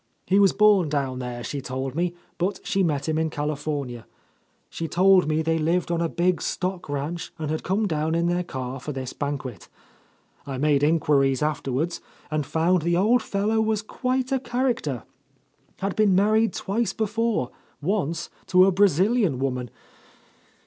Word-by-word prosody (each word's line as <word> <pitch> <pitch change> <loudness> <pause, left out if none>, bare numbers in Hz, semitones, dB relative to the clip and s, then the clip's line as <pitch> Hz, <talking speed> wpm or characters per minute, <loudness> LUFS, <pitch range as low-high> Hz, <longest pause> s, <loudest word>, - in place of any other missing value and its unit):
He 195 +2 +3
was 195 -2 +6
born 205 -6 +4
down 135 -3 -1
there, 120 -1 -5
she 140 +2 -4
told 130 0 -4
me, 175 +3 -1 0.2
but 185 +2 -1
she 195 - +1
met 150 -6 0
him 160 0 0
in 160 0 0
California. 145 -5 -3 0.6
She 165 - -5
told 185 0 +4
me 155 +1 +1
they 165 0 +1
lived 170 +3 0
on 170 -1 0
a 165 - 0
big 175 +1 +1
stock 185 -3 -3
ranch 145 +4 -3
and 155 -1 -3
had 155 - -2
come 205 +4 0
down 160 -1 0
in 170 0 +1
their 175 +1 +1
car 130 -4 -5
for 150 +4 -5
this 130 -1 -5
banquet. 140 -7 -5 0.7
I 135 -2 -5
made 145 0 +2
inquiries 145 -3 +2
afterward 150 +1 -1 0.3
and 150 -2 -1
found 170 +2 +2
the 170 +2 +1
old 220 +6 +4
fellow 215 +1 0
was 215 -1 0
quite 255 +3 -2
a 265 - +2
character; 240 - -1 0.8
had 195 0 -1
been 210 -3 +4
married 215 +3 +3
twice 225 +4 -1
before, 220 - -1 0.3
once 170 -1 -1 0.2
to 185 0 +6
a 195 - +4
Brazilian 195 - +3
woman. 125 -2 -2
165 Hz, 165 wpm, -25 LUFS, 145-195 Hz, 0.8 s, was